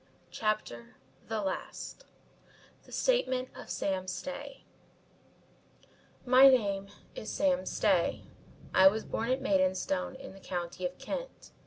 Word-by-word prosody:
CHAPTER 120 - -2 0.3
THE 220 -1 -1
LAST 195 - -5 0.8
THE - - -17
STATEMENT 260 - +1
OF - - -10
SAM 190 -1 -2
STAY 275 +8 -6 1.6
"My 255 +2 +8
name 200 -7 +3 0.3
is 215 - -6
Sam 280 -2 +1
Stay. - - +1 0.5
I 190 - +8
was 215 +3 +2
born 230 +2 -2
at 260 +1 +1
Maidstone 185 0 +1
in 265 -6 -10
the 195 - -13
County 180 -1 -3
of 180 - -12
Kent. - - -6
215 Hz, 120 wpm, -31 LUFS, 190-270 Hz, 1.6 s, My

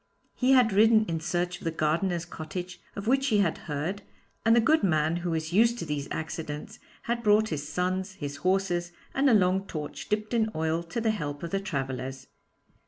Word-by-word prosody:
He 260 +1 +3
had 245 -5 +5
ridden 220 +2 +5
in 165 -3 -2
search 175 +2 -2
of - - -14
the 165 - 0
gardener's 165 +2 0
cottage 175 +2 -7
of 200 - -5
which 270 +3 +2
he 220 -5 +3
had 190 -6 +1
heard, 160 +8 -2 0.4
and 225 +1 +5
the - - +6
good 310 +8 +4
man, 160 -3 +2
who 175 0 -3
was 160 0 -2
used 230 +4 +4
to 190 - -4
these 145 -2 -3
accidents, 160 +4 -5 0.2
had 235 0 -1
brought 215 0 +4
his 150 -2 -4
sons, 185 +2 -1
his 145 -6 -6
horses, 175 +1 0 0.2
and 275 +1 +3
a 235 - +6
long 190 0 +2
torch 150 -2 -6
dipped 215 +2 -1
in 220 -2 +2
oil 160 +1 0
to 200 +8 -4
the 220 -1 +2
help 145 -8 -4
of 170 - -4
the 195 - +1
travellers. 135 -5 -4
180 Hz, 200 wpm, -28 LUFS, 160-215 Hz, 0.4 s, the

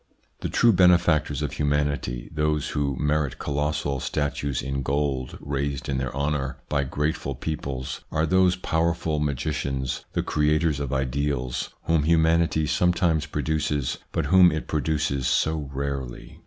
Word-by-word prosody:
The - - -3
true 115 -1 +4
benefactors 85 -5 +3
of 75 - -2
humanity, 70 -4 -1
those 75 -1 0
who 70 -2 -1
merit 75 -2 0
colossal 75 -1 -1
statues 70 -1 -2
in 70 +1 -2
gold 70 -1 -1
raised 70 -2 -3
in 65 -1 -1
their 65 -2 -2
honour 70 -1 -1
by 70 -2 +1
grateful 75 0 -2
peoples, 70 -2 -4
are 80 - +1
those 90 +1 +4
powerful 85 -2 0
magicians, 70 -2 -2
the - - 0
creators 75 0 +1
of 70 -3 -3
ideals, 65 -1 -1
whom 80 -2 +2
humanity 80 0 +3
sometimes 85 -1 +2
produces, 75 -2 -1
but - - -1
whom 90 -1 +6
it 80 0 -3
produces 75 -3 0
so 75 -3 +1
rarely. 70 -2 -5
75 Hz, 135 wpm, -25 LUFS, 70-80 Hz, -, whom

